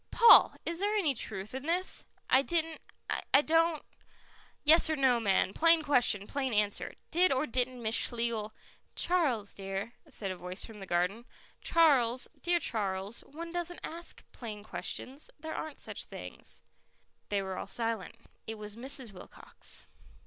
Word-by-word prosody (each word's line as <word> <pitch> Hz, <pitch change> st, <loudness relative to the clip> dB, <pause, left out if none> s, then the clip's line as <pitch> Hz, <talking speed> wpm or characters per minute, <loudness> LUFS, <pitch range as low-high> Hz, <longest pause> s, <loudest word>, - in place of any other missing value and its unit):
"Paul, 470 Hz, -, +8 dB
is 335 Hz, 0 st, -3 dB
there 410 Hz, +2 st, +1 dB
any 340 Hz, -9 st, +2 dB
truth 210 Hz, -3 st, -3 dB
in 265 Hz, +3 st, -5 dB
this?" 360 Hz, +3 st, 0 dB, 0.2 s
"I 260 Hz, -, +5 dB
didn't 325 Hz, +1 st, -1 dB, 0.5 s
I 280 Hz, -, +7 dB
don't 325 Hz, 0 st, +2 dB, 0.4 s
" -, -, -27 dB, 0.3 s
"Yes 315 Hz, +2 st, +6 dB
or 315 Hz, -, +1 dB
no, 260 Hz, -4 st, +3 dB
man; 195 Hz, -3 st, +2 dB
plain 330 Hz, 0 st, +5 dB
question, 245 Hz, -8 st, +3 dB
plain 265 Hz, -1 st, -2 dB
answer. 210 Hz, -1 st, 0 dB, 0.2 s
Did 360 Hz, +2 st, +4 dB
or 265 Hz, +2 st, +2 dB
didn't 250 Hz, -1 st, -2 dB
Miss 220 Hz, 0 st, 0 dB
Schlegel 230 Hz, -2 st, 0 dB, 0.2 s
" -, -, -37 dB
"Charles 280 Hz, -, +1 dB
dear," 195 Hz, +3 st, -5 dB, 0.2 s
said 205 Hz, -8 st, -4 dB
a -, -, -4 dB
voice 180 Hz, +2 st, -6 dB
from 220 Hz, -2 st, -11 dB
the 195 Hz, -, -8 dB
garden. 180 Hz, +7 st, 0 dB, 0.4 s
"Charles, 260 Hz, -7 st, +3 dB
dear 345 Hz, 0 st, +2 dB
Charles, 200 Hz, -, -2 dB
one 335 Hz, +3 st, -8 dB
doesn't 350 Hz, 0 st, -4 dB
ask 335 Hz, +2 st, -8 dB
plain 215 Hz, -4 st, -8 dB
questions. 265 Hz, +5 st, -4 dB
There 315 Hz, +1 st, -6 dB
aren't 315 Hz, -2 st, -5 dB
such -, -, -4 dB
things." -, -, -9 dB, 0.7 s
They 200 Hz, -1 st, 0 dB
were 190 Hz, -1 st, -4 dB
all -, -, -5 dB
silent. 225 Hz, -5 st, -2 dB, 0.3 s
It 220 Hz, 0 st, -5 dB
was 210 Hz, -1 st, -7 dB
Mrs. 260 Hz, -1 st, 0 dB
Wilcox. 180 Hz, -, -9 dB
250 Hz, 160 wpm, -31 LUFS, 210-320 Hz, 0.7 s, Paul